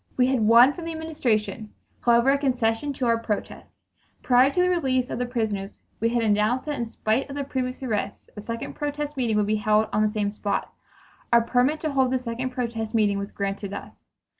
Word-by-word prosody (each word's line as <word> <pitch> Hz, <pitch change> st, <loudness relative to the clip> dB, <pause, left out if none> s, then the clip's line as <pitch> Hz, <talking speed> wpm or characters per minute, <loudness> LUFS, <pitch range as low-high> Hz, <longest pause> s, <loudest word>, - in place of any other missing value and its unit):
We 250 Hz, -, +5 dB
had 260 Hz, -1 st, +1 dB
won 235 Hz, +5 st, +7 dB
from 340 Hz, 0 st, -8 dB
the 330 Hz, -, -4 dB
Administration, 230 Hz, -10 st, -2 dB, 0.3 s
however, 235 Hz, +2 st, +4 dB
a 280 Hz, -, +3 dB
concession 250 Hz, -1 st, 0 dB
to 260 Hz, -, -2 dB
our 230 Hz, -1 st, +2 dB
protest. 215 Hz, -3 st, -5 dB, 0.4 s
Prior 255 Hz, +1 st, +5 dB
to 320 Hz, -, -2 dB
the 360 Hz, -, +4 dB
release 265 Hz, -8 st, 0 dB
of -, -, -3 dB
the 250 Hz, -, -1 dB
prisoners 215 Hz, -5 st, -3 dB, 0.2 s
we 230 Hz, -, +1 dB
had 235 Hz, 0 st, 0 dB
announced 215 Hz, +4 st, +1 dB
that 295 Hz, -3 st, -3 dB
in 235 Hz, -1 st, -3 dB
spite 225 Hz, +4 st, -1 dB
of 275 Hz, -, -6 dB
the 285 Hz, -, -2 dB
previous 260 Hz, -1 st, -4 dB
arrests 210 Hz, -5 st, -3 dB
a 210 Hz, -, -7 dB
second 230 Hz, +2 st, -5 dB
protest 295 Hz, 0 st, -4 dB
meeting 235 Hz, -5 st, 0 dB
would 210 Hz, -, +2 dB
be 215 Hz, +1 st, +1 dB
held 215 Hz, +1 st, +2 dB
on 210 Hz, -, +2 dB
the 215 Hz, -, +3 dB
same 210 Hz, -1 st, -1 dB
spot. 205 Hz, -1 st, -3 dB, 0.6 s
A 235 Hz, -, +7 dB
permit 250 Hz, +6 st, +1 dB
to 310 Hz, -, -1 dB
hold 265 Hz, -2 st, +2 dB
this 255 Hz, 0 st, -1 dB
second 245 Hz, +2 st, -3 dB
protest 235 Hz, -3 st, -3 dB
meeting 205 Hz, -2 st, +2 dB
was 200 Hz, +1 st, -5 dB
granted 200 Hz, 0 st, -4 dB
us. -, -, -8 dB
235 Hz, 215 wpm, -25 LUFS, 215-265 Hz, 0.6 s, won